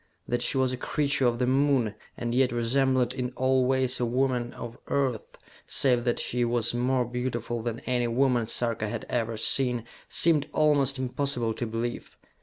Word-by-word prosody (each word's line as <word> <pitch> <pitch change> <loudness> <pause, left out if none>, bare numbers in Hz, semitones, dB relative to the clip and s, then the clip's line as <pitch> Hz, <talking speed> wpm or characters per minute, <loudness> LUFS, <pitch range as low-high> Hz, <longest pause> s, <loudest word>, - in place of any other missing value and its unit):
That 120 0 0
she 135 - +1
was 130 -1 +2
a - - -3
creature 140 -1 0
of 120 -1 +1
the 125 - +1
Moon, 130 -4 +2 0.2
and 120 0 -3
yet 130 0 +3
resembled 125 +1 +1
in 125 -1 -3
all 130 0 +2
ways 130 -1 +1
a 125 - +1
woman 125 -1 0
of 120 -1 -8
Earth, 130 -5 -1 0.3
save 125 -3 +2
that 120 - +1
she 125 0 -1
was 120 -1 0
more 125 +1 +1
beautiful 120 -1 -3
than 115 0 -4
any 125 -1 0
woman 120 -1 +2
Sarka 115 -2 -1
had - - -5
ever 115 -2 -1
seen, 125 0 +1 0.3
seemed 155 -3 +3
almost 145 -3 +3
impossible 130 -2 -1
to 120 - -4
believe. 115 +2 -4
125 Hz, 175 wpm, -27 LUFS, 120-130 Hz, 0.3 s, yet